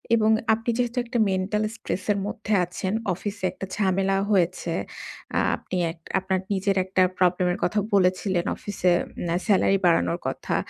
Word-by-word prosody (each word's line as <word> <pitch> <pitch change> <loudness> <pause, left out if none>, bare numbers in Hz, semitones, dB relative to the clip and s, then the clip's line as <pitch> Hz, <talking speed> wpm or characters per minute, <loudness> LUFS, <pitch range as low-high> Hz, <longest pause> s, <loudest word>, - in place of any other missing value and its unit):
এবং 220 -1 +3 0.2
আপনি 225 +2 -2
যেহেতু 245 0 -1
একটা 235 0 -2
মেন্টাল 190 +3 0
স্ট্রেস 185 -4 -4
এর 205 - +1
মধ্যে 215 0 -3
আছেন। 185 +3 -4 0.2
অফিসে 205 +1 -6
একটা - - -7
ঝামেলা 195 -1 +1
হয়েছে। 175 -2 +1 0.6
আ - - +4 0.2
আপনি 185 - -5
এক 165 - -14 0.2
আপনার 190 0 -1
নিজের 195 0 +1
একটা 190 0 +1 0.2
প্রবলেম 180 0 +3
এর - - -4
কথা 210 +4 +1 0.2
বলেছিলেন 185 -1 +2
অফিসে 185 -3 0 0.4
আ - - +2
সেলারি 195 -1 +4
বাড়ানোর 90 - +3
কথা। - - -2
190 Hz, 155 wpm, -25 LUFS, 185-210 Hz, 0.6 s, আ